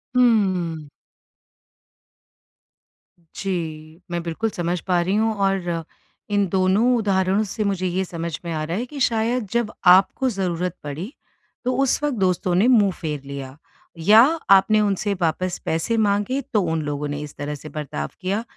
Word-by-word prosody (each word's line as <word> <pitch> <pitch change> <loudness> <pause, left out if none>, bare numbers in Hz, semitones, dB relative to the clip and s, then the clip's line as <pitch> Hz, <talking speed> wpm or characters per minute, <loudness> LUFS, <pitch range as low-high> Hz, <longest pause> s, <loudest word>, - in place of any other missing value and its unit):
हुँ। 185 -10 +2 2.5
जी, 160 -3 -5
मैं 170 0 -1
बिल्कुल 170 +7 -2
समझ 175 -2 -2
पा 180 -2 +3
रही 185 +3 0
हूँ 220 +1 +2
और 190 -4 -1 0.5
इन 205 -1 +2
दोनों 195 +7 +3
उदाहरणों 195 -1 +1
से 215 +1 -3
मुझे 195 -2 -1
ये 185 +2 -1
समझ 170 -3 -5
में 170 - -3
आ 155 -1 -2
रहा 165 +4 -3
है 240 - -2
कि 280 +3 -9
शायद 230 -1 +1
जब 235 -2 0 0.2
आपको 195 +8 +4
ज़रूरत 180 -4 -2
पड़ी, 155 - -6 0.5
तो 255 - +1
उस 270 - +1
वक़्त 295 -3 0
दोस्तों 185 -2 +1
ने 195 +6 +4
मुँह 215 -6 +5
फेर 150 -3 -3
लिया 140 -1 -7 0.4
या 210 +7 +7 0.3
आपने 195 +2 +6
उनसे 205 0 0
वापस 175 +2 0
पैसे 165 +8 0
माँगे 205 +5 +1
तो 210 - +4
उन 160 -1 0
लोगों 145 0 -3
ने 145 0 -4
इस 150 -1 -8
तरह 145 +1 -4
से 155 +2 -10
बर्ताव 140 - -5
किया। 195 +4 -1
185 Hz, 160 wpm, -22 LUFS, 165-210 Hz, 2.5 s, या